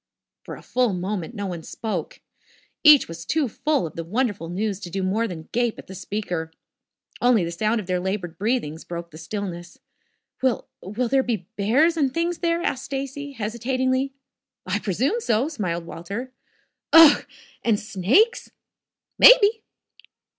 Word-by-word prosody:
For - - -7
a - - -14
full 250 -5 +1
moment 185 +2 -4
no 205 -2 -4
one 175 -3 -5
spoke. 220 +6 -5 0.6
Each 300 -3 +8
was 165 0 -8
too 305 - 0
full 290 - 0
of 160 - -8
the 165 - -4
wonderful 205 -2 -2
news 200 +2 -2
to 180 - -8
do 195 +2 -3
more 215 +5 0
than 160 -5 -8
gape 240 -1 0
at - - -10
the 190 - -10
speaker. 180 -4 -4 0.7
Only 245 -5 +4
the 170 - -3
sound 215 +6 0
of 210 - -6
their 180 0 -1
labored 180 -3 -4
breathings 205 -8 -1
broke 170 0 -7
the 155 - -11
stillness. 175 0 -6 0.6
"Will 260 -3 0
will 215 +7 -2
there 270 +3 +3
be 225 -8 -3
bears 275 +12 +3
and 275 -4 +2
things 335 +3 -1
there?" 340 0 0
asked 260 - -2
Stacy, 275 +1 -5
hesitatingly. 260 +4 -1 0.5
"I 185 +2 -1
presume 235 - 0
so," 240 - +1
smiled 175 - -3
Walter. 200 +11 -7 0.6
"Ugh! 325 -2 +9 0.4
And 220 -3 +2
snakes?" 230 - +2 0.7
"Maybe." 445 -3 +7
215 Hz, 155 wpm, -23 LUFS, 180-265 Hz, 0.7 s, Ugh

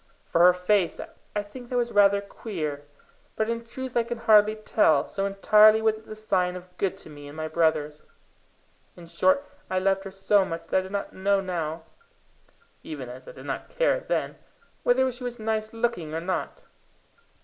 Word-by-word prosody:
For 170 - +1
her 180 +1 +9
face, 180 -1 +1 0.4
I 210 - 0
think 240 +4 -11
that 250 - -1
was 240 -1 0
rather 200 -1 +5
queer, 155 -8 -5 0.5
but 220 - 0
in 230 0 -2
truth 260 +2 -7
I 240 - +4
can 235 +1 -4
hardly 215 -1 +5
tell, 210 -8 +2
so 195 0 -2
entirely 210 +2 +6
was 220 -1 +1
it 220 - -21
the 215 - -7
sign 185 -4 0
of 180 0 -11
good 195 -1 -1
to - - -11
me 145 -1 -11
and 145 +2 -11
my 155 0 -3
brothers; 155 -2 0 1.0
in 175 - -11
short, 280 +11 +2 0.2
I 185 - -1
loved 195 +1 +1
her - - -5
so 195 +1 +2
much 165 -3 -5
that - - +3
I 185 - -5
do - - -12
not 200 0 -4
know 195 +1 +1
now, 165 -4 -3 1.0
even 140 -5 -7
as 130 +1 -11
I - - -9
did - - -12
not - - -5
care - - +1
then, - - -2 0.4
whether 260 +1 +3
she 250 +1 -9
was 245 -1 -4
nice 220 -1 -2
looking 225 -9 -2
or - - -1
not. 185 +2 -4
200 Hz, 195 wpm, -26 LUFS, 170-220 Hz, 1.0 s, her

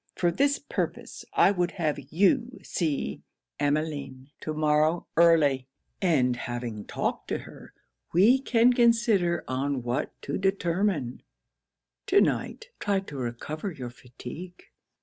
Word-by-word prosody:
For 175 -1 +2
this 280 +10 +2
purpose, 285 - -4
I - - +5
would 180 -3 -1
have 155 -5 -1
you 235 - +2
see 140 - -2 0.4
Emmeline 145 -2 -2
to 155 - -4
morrow 155 +2 +2
early; 150 -6 +4 0.3
and 135 -9 +3
having 120 -3 -5
talked - - -3
to - - -1
her, - - -12 0.4
we 215 +10 +5
can 245 -2 +4
consider 230 -7 +3
on 130 0 -1
what 120 +2 -3
to 140 - -3
determine. 185 - 0 0.9
To 400 +1 +5
night, - - -1
try 200 -2 +1
to 150 -7 -10
recover 135 - -4
your 125 -6 -7
fatigue.' 130 +9 -10
160 Hz, 125 wpm, -27 LUFS, 135-195 Hz, 0.9 s, I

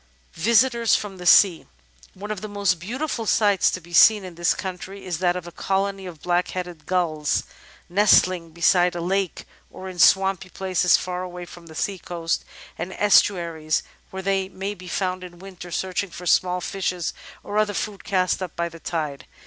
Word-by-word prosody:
Visitors 235 +4 +3
from 200 -2 -4
the 180 -1 -5
Sea 180 -3 +6 0.5
One 205 +3 -7
of 210 -3 -4
the 215 - -5
most 200 -4 0
beautiful 235 - -4
sights 205 -3 +3
to - - -3
be 175 0 -16
seen 210 +3 +7
in 180 - -8
this 170 0 +1
country 190 +1 -7
is 175 -3 -3
that 180 -1 +2
of 180 -1 -5
a 175 - -9
colony 195 +1 -2
of 165 -4 -11
Blackheaded 175 -2 -2
Gulls 160 -5 0 0.4
nesting 185 -2 +3
beside 175 +2 +3
a - - -3
lake 185 +1 -1 0.2
or 190 - -9
in 185 -1 -8
swampy 190 0 +4
places 185 -2 +2
far 180 0 -4
away 180 -1 -7
from 175 -1 -13
the 160 - -12
sea 195 +3 -2
coast 170 -2 -3 0.4
and 180 +3 -4
estuaries 170 -6 +2 0.3
where 190 0 -7
they 195 0 0
may 195 +1 -4
be 185 -2 -12
found 185 0 -2
in 175 -1 -10
winter 185 -1 -10
searching 185 +2 -2
for 180 +1 -10
small 180 +1 +2
fishes 180 -2 -2 0.3
or 205 +1 -1
other 210 -1 +1
food 205 -2 -4
cast 185 -2 0
up 185 -3 -5
by 170 0 -2
the 165 0 -12
tide. 155 -5 -4
185 Hz, 180 wpm, -23 LUFS, 175-195 Hz, 0.5 s, seen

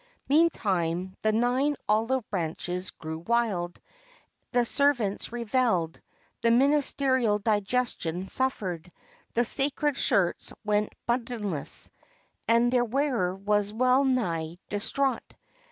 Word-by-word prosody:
Meantime 190 - +1
the 215 - +2
nine 250 +6 +1
olive 225 +4 +1
branches 180 0 -3
grew 160 0 -7
wild, 195 -3 -1 0.7
the 245 -1 +2
servants 245 -8 0
revelled, 230 -8 0 0.4
the 230 - +3
ministerial 260 -3 +3
digestion 205 -4 -1
suffered, 190 -8 -2 0.5
the 240 +1 +3
sacred 285 +3 +3
shirts 190 -9 +1
went 210 0 +1 0.2
buttonless, 230 - -1 0.6
and 235 +1 +3
their 245 -1 +3
wearer 240 -7 0
was 205 +1 0
wellnigh 245 - +1
distraught. 240 +5 -2
225 Hz, 95 wpm, -27 LUFS, 190-255 Hz, 0.7 s, the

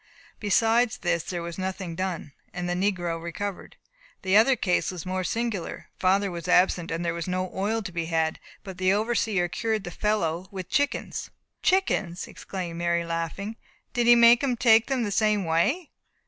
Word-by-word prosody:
Beside 225 +3 +3
this 170 -2 +1
there 175 -2 -4
was 170 +1 -6
nothing 185 -2 -4
done, 180 -5 -4 0.2
and 180 -1 -3
the 175 - 0
negro 180 -3 -1
recovered. 190 +3 -5 0.5
The 190 0 +2
other 230 +5 +6
case 180 -6 +1
was 180 -2 -6
more 185 0 -2
singular. 225 -1 -3
Father 195 +1 +2
was 170 0 -6
absent, 180 -1 +3
and 165 +1 -2
there 170 - 0
was 170 0 -4
no 185 0 -2
oil 215 +4 -1
to 195 - -6
be 170 -1 -2
had, 160 -1 0 0.2
but 190 -3 -9
the 185 +1 +3
overseer 215 -4 +1
cured 215 +6 -2
the 175 - -6
fellow 185 -3 -1
with 185 -3 -7
chickens." 285 0 -1 0.3
"Chickens!" 200 - +1
exclaimed 175 -3 -6
Mary, 170 0 +1
laughing. 165 +6 -4 0.4
"Did 240 -2 +1
he 240 - +9
make 235 0 +7
him 255 -3 0
take 225 -1 +5
them 265 -3 0
the 205 - -2
same 210 -1 +2
way?" 215 - +1
190 Hz, 175 wpm, -26 LUFS, 170-220 Hz, 0.5 s, he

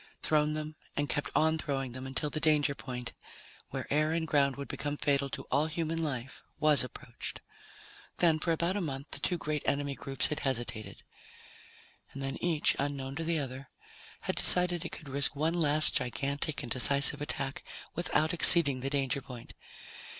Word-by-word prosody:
Thrown 150 0 +2
them 155 0 -5 0.2
and 145 0 +1
kept 145 - -1
on 160 0 +3
throwing 135 -5 -3
until 135 +3 -3
the 155 - -2
danger 150 -2 +3
point, 125 -3 -6 0.6
where - - -4
air 155 +2 +2
and 165 -1 -1
ground 140 -3 +2
would 140 0 -6
become 145 +1 -3
fatal 140 -1 +1
to - - -5
all 145 +4 +3
human 165 0 -2
life, 130 -5 -4 0.2
was 150 -3 +5
approached. 125 - -7 0.8
Then, 165 -3 +4
for 165 - 0
about 170 +3 +1
a 205 - 0
month, 140 -3 -5
the - - -6
two 180 - 0
great 150 -2 -2
enemy 140 0 0
groups 135 -1 0
had 150 - -2
hesitated. 120 -6 -3 1.1
And 140 - -6
then 135 0 -4
each, 165 -4 +2
unknown 140 -1 -3
to 165 - -2
the 165 0 0
other, 135 -2 -5 0.5
had - - -2
decided 180 -1 +2
it 170 - -5
could 155 - -8
risk 140 +2 +2
one 155 +3 +1
last 155 -2 +4
gigantic 140 +6 -2
and 120 - -7
decisive 140 +2 +5
attack 135 -2 -3 0.3
without 160 -1 +1
exceeding 160 -5 +6
the 135 +2 -2
danger 140 -1 0
point. 125 -2 -10
145 Hz, 170 wpm, -31 LUFS, 135-155 Hz, 1.1 s, exceeding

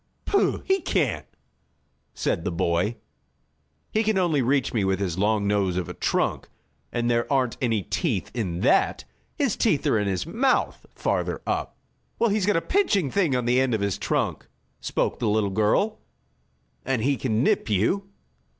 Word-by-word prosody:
"Pooh! 400 - +1
He 385 -1 +2
can't!" 140 - -1 0.9
said 80 - -1
the - - -1
boy. 85 +6 0 1.0
"He 220 - +2
can 220 -2 +1
only 170 -6 +2
reach 135 +1 +1
me 110 -4 +1
with 95 0 +1
his 95 -3 -2
long 105 0 +2
nose 100 -3 +1
of 90 - -2
a - - -6
trunk, - - -1 0.4
and 120 0 -1
there 120 +1 0
aren't 130 -4 +1
any 115 -5 +1
teeth 120 - -2
in 90 -8 -3
that. - - +2 0.3
His - - 0
teeth - - +1
are 110 - +3
in 105 - -1
his 95 +4 -1
mouth, 250 +10 0
farther - - -1
up." - - -2 0.4
"Well, 230 -2 +2
he's 205 -2 +1
got 205 - +3
a - - +1
pinching 205 - +1
thing 175 -10 +2
on 125 -1 -1
the 125 +1 +3
end 130 -3 +1
of 105 - -2
his 100 -2 -1
trunk," - - -1 0.3
spoke - - -1
the 115 -3 0
little 105 -1 +1
girl, 110 - +1 0.8
"and 125 -4 -1
he 140 +2 +2
can 115 -3 0
nip - - +1
you." 115 - +1
120 Hz, 175 wpm, -25 LUFS, 100-170 Hz, 1.0 s, are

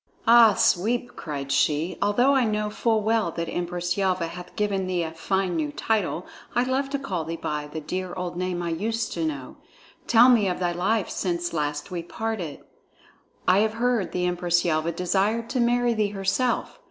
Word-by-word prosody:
"Ah, 230 -3 +7
Sweep!" 240 +6 +1
cried 140 -3 -5
she, 150 +4 +1
"although 245 +7 +3
I 265 -2 +3
know 210 -1 -1
full 220 0 +1
well 220 -4 +2
that 170 0 -3
Empress 175 +1 -2
Yelva 185 -4 0
hath 180 +1 -10
given 200 -3 0
thee 180 -2 0
a 160 - -4
fine 185 +2 -1
new 155 -3 -1
title, 195 -2 -1 0.3
I 245 - +3
love 265 +2 -1
to 280 - -1
call 195 -12 -3
thee 165 +1 -4
by 150 -2 -4
the 155 +1 -6
dear 185 +4 -4
old 180 -1 -4
name 180 -1 -2
I 170 - -2
used 220 +7 -2
to 165 - -2
know. 140 -5 -4 0.5
Tell 235 +1 +7
me 235 -6 +5
of 180 - -1
thy 175 -1 0
life 190 +4 0
since 175 -2 -2
last 150 +2 -2
we 175 -2 -3
parted. 190 -4 -4 0.9
I 185 +2 +5
have 215 +1 +2
heard 235 -4 0
the 180 0 -1
Empress 175 0 +1
Yelva 160 0 +1
desired 200 +7 0
to 260 - 0
marry 240 0 +2
thee 215 -2 +1
herself. 205 - -1
185 Hz, 190 wpm, -25 LUFS, 170-225 Hz, 0.9 s, Ah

